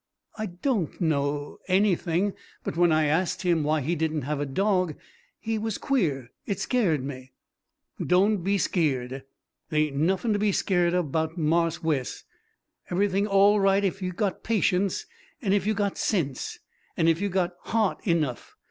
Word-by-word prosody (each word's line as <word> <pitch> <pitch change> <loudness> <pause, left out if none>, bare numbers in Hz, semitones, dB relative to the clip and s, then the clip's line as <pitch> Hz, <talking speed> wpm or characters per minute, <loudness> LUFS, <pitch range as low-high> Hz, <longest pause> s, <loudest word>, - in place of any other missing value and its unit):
"I 215 -1 -3
don't 185 - -2
know 145 -3 -1
anything; 190 -1 +2 0.3
but - - -4
when 175 0 +4
I 155 0 +3
asked 165 +6 0
him 170 -3 +2
why 155 +1 +1
he 155 +6 -1
didn't 160 -2 -1
have 145 +2 -2
a 145 - -2
dog 185 +1 +1 0.4
he 225 -1 -2
was 220 -1 -2
queer. 150 - 0 0.2
It 200 -2 -2
scared 190 - +1
me." 130 -1 -7 0.7
"Doan 195 +4 +3
be 195 +2 0
skeered. 135 -8 -1 0.4
They 155 0 +2
ain' 145 +3 0
nuffin' 195 +4 +1
to 205 - 0
be 205 -1 +2
skeered 175 -2 +2
of 175 -6 0
'bout 160 +2 -1
Marse 165 +1 +1
Wes. 145 -6 -1 0.7
Eve'ything 195 +2 +1
all 200 +1 +5
right 195 0 +3
ef 195 +1 -2
you 180 -1 -2
got 195 +1 -2
patience, 200 - +1 0.3
an' 200 -9 0
ef 200 -1 +1
you 215 - +2
got 200 -1 -1
sense, 150 - -1 0.4
an' 165 - +3
ef 165 +2 +3
you 200 - 0
got 180 -1 0
haht 220 -4 +1
enough. 155 -8 -1
175 Hz, 165 wpm, -26 LUFS, 155-200 Hz, 0.7 s, all